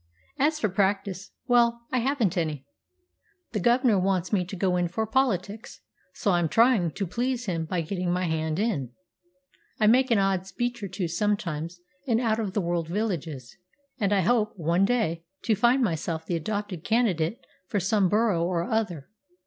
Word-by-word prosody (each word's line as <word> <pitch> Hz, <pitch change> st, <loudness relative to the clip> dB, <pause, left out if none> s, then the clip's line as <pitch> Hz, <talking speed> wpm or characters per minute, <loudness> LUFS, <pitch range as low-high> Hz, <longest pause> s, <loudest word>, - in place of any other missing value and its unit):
As 305 Hz, +3 st, +2 dB
for 215 Hz, -, +2 dB
practice 195 Hz, -1 st, -1 dB, 0.2 s
well, 235 Hz, -2 st, +3 dB
I 255 Hz, -, +2 dB
haven't 240 Hz, -, +1 dB
any. 155 Hz, -6 st, -2 dB, 0.9 s
The 215 Hz, -, -1 dB
gov'nor 240 Hz, 0 st, +3 dB
wants 185 Hz, 0 st, 0 dB
me 190 Hz, -3 st, +3 dB
to 190 Hz, -, -7 dB
go 185 Hz, 0 st, +1 dB
in 175 Hz, -1 st, +1 dB
for 220 Hz, +6 st, -2 dB
politics, 220 Hz, -3 st, -1 dB, 0.3 s
so 200 Hz, -, 0 dB
I'm 175 Hz, -2 st, +2 dB
trying 225 Hz, -4 st, +4 dB
to 200 Hz, -, -2 dB
please 245 Hz, +6 st, -2 dB
him 165 Hz, -5 st, -2 dB
by 170 Hz, +2 st, -1 dB
getting 180 Hz, +2 st, -2 dB
my 180 Hz, +1 st, 0 dB
hand 160 Hz, -1 st, -1 dB
in. 160 Hz, -, -1 dB, 0.9 s
I 215 Hz, -, +3 dB
make 255 Hz, +4 st, +5 dB
an 230 Hz, -, +4 dB
odd 195 Hz, -1 st, +1 dB
speech 240 Hz, +4 st, -3 dB
or 200 Hz, -, -3 dB
two 185 Hz, -1 st, -3 dB
sometimes 175 Hz, -2 st, -2 dB, 0.3 s
in 230 Hz, -2 st, +2 dB
out 225 Hz, -2 st, +1 dB
of 205 Hz, -4 st, -2 dB
the 205 Hz, -, +1 dB
world 170 Hz, -2 st, -1 dB
villages, 165 Hz, -, -3 dB, 0.4 s
and 200 Hz, -3 st, +1 dB
I 200 Hz, -2 st, +3 dB
hope, 215 Hz, +2 st, +2 dB
one 170 Hz, +3 st, +2 dB
day, 195 Hz, -8 st, 0 dB, 0.2 s
to 225 Hz, -, +2 dB
find 240 Hz, +5 st, +3 dB
myself 160 Hz, -4 st, -2 dB
the 175 Hz, -, -1 dB
adopted 200 Hz, 0 st, -3 dB
candidate 220 Hz, -5 st, +1 dB, 0.3 s
for 205 Hz, -, 0 dB
some 195 Hz, 0 st, +2 dB
borough 210 Hz, -4 st, +2 dB
or 170 Hz, -1 st, 0 dB
other. 180 Hz, -9 st, -2 dB
195 Hz, 175 wpm, -26 LUFS, 170-225 Hz, 0.9 s, make